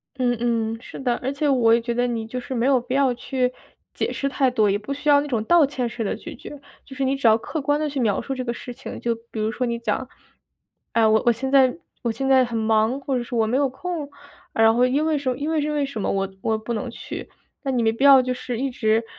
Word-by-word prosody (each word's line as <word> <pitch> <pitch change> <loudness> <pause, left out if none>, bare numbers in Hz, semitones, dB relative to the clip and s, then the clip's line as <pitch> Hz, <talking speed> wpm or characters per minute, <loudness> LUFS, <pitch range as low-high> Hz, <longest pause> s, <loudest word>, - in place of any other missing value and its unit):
嗯 245 -2 +1
嗯， 230 -1 -1
是 - - -10
的， 245 -3 0
而 265 +2 -3
且 290 +1 -1
我 245 -5 +4
也 235 - +5
觉 235 0 -2
得 245 +1 +1
你 230 -2 -3
就 250 +3 -5
是 255 +1 -6
没 235 - +1
有 265 -2 +4
必 250 +2 -4
要 270 -2 +3
去 250 +1 -1 0.4
解 - - -2
释 275 - -2
太 270 -1 +2
多， 215 -4 +2
也 200 - +2
不 215 +7 -8
需 290 +2 -2
要 285 -1 +6
那 295 - -5
种 230 -6 -1
道 345 +5 +5
歉 260 -3 -2
式 230 -1 -4
的 200 - -1
拒 - - -9
绝， 295 - -10 0.2
就 270 - -12
是 270 - -2
你 265 +1 +1
只 270 -3 +1
要 220 0 +6
客 310 +6 -5
观 290 +2 +1
地 305 - 0
去 280 -1 -3
描 210 -5 +1
述 270 - -4
这 255 -1 -3
个 235 - -2
事 245 +1 -8
情。 - - -8
就 235 - 0 0.2
比 220 - -5
如 215 +1 0
说 250 +1 -2
你 235 - -1
讲， 245 +2 -2 0.9
哎， 230 -1 +4
我 220 0 +4
我 240 - +7
现 265 +4 -3
在 265 -1 +5 0.2
我 235 - 0
现 270 +4 -3
在 265 -1 +5
很 235 -2 -3
忙， 220 +3 +2
或 270 -1 -2
者 245 - -1
是 240 0 -6
我 225 - +3
没 235 +4 +1
有 280 -1 +2
空， 315 +2 -5 0.4
然 225 0 +5
后 245 +2 +4
因 290 +5 +1
为 315 - +1
什 260 -3 -1
因 300 +3 -2
为 315 -2 +1
是 300 - -1
为 290 -2 0
什 270 -6 -5
么 - - -1
我 195 0 0
我 220 -1 0
不 220 +2 -5
能 240 +3 -3
去。 235 - -8 0.3
那 275 - -2
你 245 -3 +1
没 225 - +3
必 230 +5 -3
要 275 -1 +9
就 255 0 -1
是 245 -1 -5
一 270 +2 -1
直 225 -2 +1
250 Hz, 305 characters per minute, -23 LUFS, 230-275 Hz, 0.9 s, 要